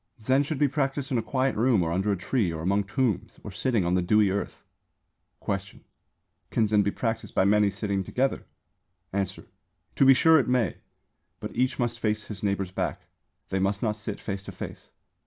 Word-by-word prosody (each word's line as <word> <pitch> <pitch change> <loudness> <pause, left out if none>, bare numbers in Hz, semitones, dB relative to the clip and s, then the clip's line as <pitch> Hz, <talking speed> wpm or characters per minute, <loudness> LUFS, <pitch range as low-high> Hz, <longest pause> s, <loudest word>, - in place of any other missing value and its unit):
Zen 130 +5 +2
should 145 +1 -2
be 145 - +3
practised 135 -1 -2
in 125 - +2
a - - 0
quiet 130 +2 0
room 115 -4 +3
or 80 - -1
under 95 +4 +1
a 100 - 0
tree 95 0 0
or 80 -1 -5
among 100 +3 +1
tombs 110 -2 -1
or 105 - -7
sitting 110 0 0
on 85 - +1
the 90 - +3
dewy 100 +2 +3
earth. 100 - -4 0.8
Question. 95 0 -4 0.7
Can 110 - +2
Zen 105 0 +4
be 100 - +1
practised 115 +1 -3
by 95 - +4
many 105 0 +4
sitting 100 -1 -2
together? 130 +8 -1 0.7
Answer. 95 -1 -2 0.5
To - - +5
be 135 0 +8
sure 160 +3 +6
it 135 - 0
may; 125 -3 +1 0.6
but - - -7
each 130 +1 +1
must 120 -1 -1
face 105 -2 -1
his 105 -3 -5
neighbour's 100 -2 -1
back. 90 -5 -3 0.4
They 95 - 0
must 100 +2 0
not 105 -2 +1
sit 105 -1 -5
face 100 -2 -5
to - - -7
face. - - -8
105 Hz, 195 wpm, -27 LUFS, 95-125 Hz, 0.8 s, be